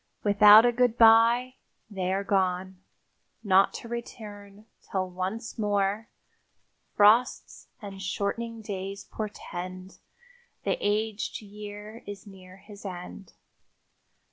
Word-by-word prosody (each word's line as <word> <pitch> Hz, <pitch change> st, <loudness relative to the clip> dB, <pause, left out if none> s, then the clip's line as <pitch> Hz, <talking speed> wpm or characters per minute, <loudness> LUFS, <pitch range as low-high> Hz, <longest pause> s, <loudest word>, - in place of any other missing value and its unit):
Without 210 Hz, +2 st, +8 dB
a 240 Hz, -, +4 dB
goodby 240 Hz, +1 st, +4 dB, 0.3 s
they 190 Hz, -3 st, -3 dB
are 195 Hz, +1 st, -1 dB
gone, 185 Hz, -1 st, -1 dB, 0.6 s
not 195 Hz, -1 st, +4 dB
to -, -, -8 dB
return 210 Hz, -3 st, -9 dB, 0.3 s
till 190 Hz, -1 st, -1 dB
once 185 Hz, +6 st, -5 dB
more 205 Hz, +1 st, 0 dB, 0.9 s
"Frosts 220 Hz, +4 st, +3 dB, 0.2 s
and 195 Hz, -1 st, -8 dB
shortening 220 Hz, +4 st, -3 dB
days 195 Hz, -1 st, -6 dB
portend 185 Hz, -3 st, -7 dB, 0.6 s
The -, -, 0 dB
aged 215 Hz, +1 st, -2 dB
year 210 Hz, +2 st, -10 dB
is 205 Hz, 0 st, -8 dB
near 185 Hz, -2 st, -14 dB
his 205 Hz, +1 st, -14 dB
end." 185 Hz, 0 st, -9 dB
205 Hz, 100 wpm, -27 LUFS, 190-220 Hz, 0.9 s, Without